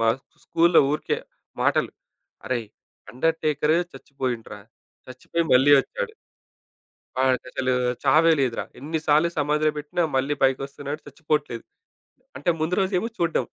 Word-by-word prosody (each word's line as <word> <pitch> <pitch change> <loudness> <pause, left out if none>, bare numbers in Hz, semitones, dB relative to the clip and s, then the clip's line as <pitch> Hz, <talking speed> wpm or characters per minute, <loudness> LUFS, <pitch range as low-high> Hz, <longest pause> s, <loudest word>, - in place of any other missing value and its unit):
మా 115 - +3 0.4
స్కూలు‌లో 170 +1 +4
ఊరికే, 150 - -1 0.4
మాటలు - - +2 0.6
అరేయ్! 120 -4 -2 0.4
అండర్‌టేకరే 155 +2 +1
చచ్చిపోయిండు 130 -5 -5
రా! 105 - -11 0.5
చచ్చిపోయి 165 +6 -3
మళ్ళీ 135 +3 +6
ఒచ్చాడు... 485 - -5 1.1
ఆడికసలు 130 0 0 0.3
చావే 165 +1 +5
లేదురా! 125 -3 0
ఎన్ని 155 +4 -3
సార్లు 155 +3 +4
సమాధిలో 150 +1 +2
పెట్టినా 150 +4 -2
మళ్ళీ 135 +3 +1
పైకోస్తున్నాడు 140 +2 -1
చచ్చిపోట్లేదు. 145 -4 -2 0.7
అంటే 145 +6 -1
ముందు 165 +3 0
రోజేమో 190 +4 0
చూడడం. 170 -1 +1
150 Hz, 110 wpm, -24 LUFS, 130-165 Hz, 1.1 s, మళ్ళీ